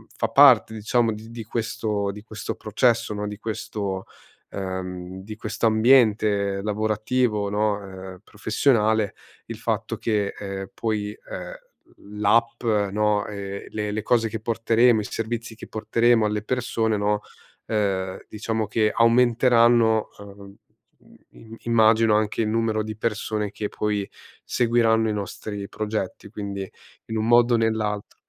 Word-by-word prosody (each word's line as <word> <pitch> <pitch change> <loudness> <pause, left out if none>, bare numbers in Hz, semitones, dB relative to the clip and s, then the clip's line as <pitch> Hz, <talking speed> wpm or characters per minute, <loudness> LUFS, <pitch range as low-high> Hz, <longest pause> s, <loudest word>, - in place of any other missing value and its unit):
fa - - -1
parte - - +6
diciamo 115 +2 +1
di 110 +1 -10
di 115 -1 -7
questo 110 -2 -2
di 105 +1 -10
questo 110 -3 -6
processo, 115 +1 +1
no, 105 0 -3
di 105 0 -6
questo, 100 -3 -4 0.4
ehm, 95 -1 -5
di 110 +2 -8
questo 110 +1 -1
ambiente 110 -4 +3
lavorativo, 110 +1 0
no, 105 0 +1
ehm, 95 -1 -10
professionale 110 -1 +1 0.3
il - - -7
fatto - - -2
che, 105 -3 -1
ehm, 95 -1 -6
poi, 105 -2 -2
ehm, - - -8 0.7
l'app, 115 +3 +2
no, 105 -1 +1
ehm, 100 -1 -6
le 105 -1 -3
le 105 +1 -2
cose 115 0 +2
che 110 +1 -4
porteremo, 115 +1 +3
i - - -2
servizi 115 +2 -4
che - - -11
porteremo 115 +1 +2
alle 105 0 -1
persone, 115 -2 0
no, 105 +1 0 0.5
ehm, 95 -3 -1
diciamo 110 +1 -2
che 110 +1 +2
aumenteranno, 115 -1 +4
uhm, 100 -1 -12 0.8
im 115 0 -13
immagino 110 -1 +4
anche 110 +1 0
il 110 - 0
numero 110 -1 0
di 110 0 -6
persone 110 -2 -2
che 105 -1 -4
poi 105 -2 -2 0.3
seguiranno 115 -2 +2
i - - 0
nostri 100 0 -5
progetti, 105 -2 -4
quindi 100 -2 -5 0.4
in 110 - -4
un 110 +1 -1
modo 120 +1 +5
o - - +3
nell'altro. 110 -2 -1
110 Hz, 140 wpm, -24 LUFS, 105-115 Hz, 0.8 s, parte